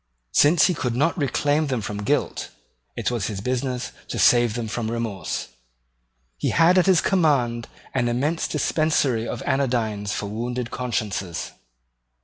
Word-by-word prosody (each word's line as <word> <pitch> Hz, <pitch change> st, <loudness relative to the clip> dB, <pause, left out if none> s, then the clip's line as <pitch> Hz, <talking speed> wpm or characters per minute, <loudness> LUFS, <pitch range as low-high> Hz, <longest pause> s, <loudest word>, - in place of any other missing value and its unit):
Since 155 Hz, +3 st, +5 dB
he 180 Hz, -, +3 dB
could 125 Hz, -7 st, -2 dB
not 155 Hz, +6 st, +2 dB
reclaim 145 Hz, 0 st, +1 dB
them 130 Hz, -3 st, -1 dB
from 105 Hz, 0 st, -4 dB
guilt, 140 Hz, +8 st, -1 dB, 0.5 s
it -, -, -1 dB
was 115 Hz, -6 st, -1 dB
his 105 Hz, -3 st, -4 dB
business 125 Hz, +2 st, -2 dB, 0.2 s
to -, -, -4 dB
save 120 Hz, -3 st, +4 dB
them 120 Hz, -2 st, -3 dB
from 110 Hz, +1 st, -3 dB
remorse. 115 Hz, -7 st, -3 dB, 0.9 s
He -, -, -1 dB
had 170 Hz, +3 st, +5 dB
at 185 Hz, -, +2 dB
his 185 Hz, -3 st, +5 dB
command 135 Hz, -, +1 dB, 0.3 s
an 125 Hz, -2 st, +1 dB
immense 140 Hz, +8 st, 0 dB
dispensary 145 Hz, -7 st, +1 dB
of -, -, -4 dB
anodynes 115 Hz, -6 st, 0 dB
for 105 Hz, -, -3 dB
wounded 120 Hz, +3 st, -4 dB
consciences. 105 Hz, -8 st, -3 dB
125 Hz, 145 wpm, -23 LUFS, 110-145 Hz, 0.9 s, Since